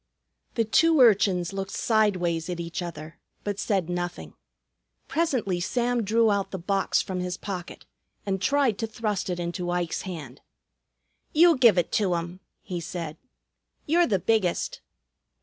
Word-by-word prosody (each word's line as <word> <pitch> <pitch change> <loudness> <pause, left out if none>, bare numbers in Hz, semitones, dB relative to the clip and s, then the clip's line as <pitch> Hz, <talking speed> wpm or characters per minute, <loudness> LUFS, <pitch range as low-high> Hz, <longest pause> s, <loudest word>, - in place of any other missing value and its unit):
The 230 - +2
two 320 +8 +4
urchins 195 -6 +4
looked 195 0 -4
sideways 185 -8 +1
at 175 -1 -3
each 170 +1 -4
other, 160 -2 -8 0.2
but 205 -1 -3
said 195 -5 0
nothing. 175 0 -4 0.7
Presently 255 - 0
Sam 240 +6 0
drew 225 +2 +3
out 200 -1 0
the 190 - -5
box 195 +2 0
from 190 -2 -4
his 180 0 -3
pocket 185 -4 -7 0.4
and 195 -2 -1
tried 265 0 +2
to 225 - -1
thrust 215 -3 -2
it 175 -1 -2
into 175 +1 -3
Ike's 175 -1 -1
hand. 175 -5 -8 0.9
"You 335 +2 +6
give 235 -7 +5
it 175 - +1
to 190 -5 +1
'um," 170 +2 -5 0.2
he 180 -2 -4
said. 165 -2 -5 0.7
"You're 340 +3 +3
the 200 - +2
biggest." 190 -1 0
190 Hz, 150 wpm, -26 LUFS, 175-225 Hz, 0.9 s, You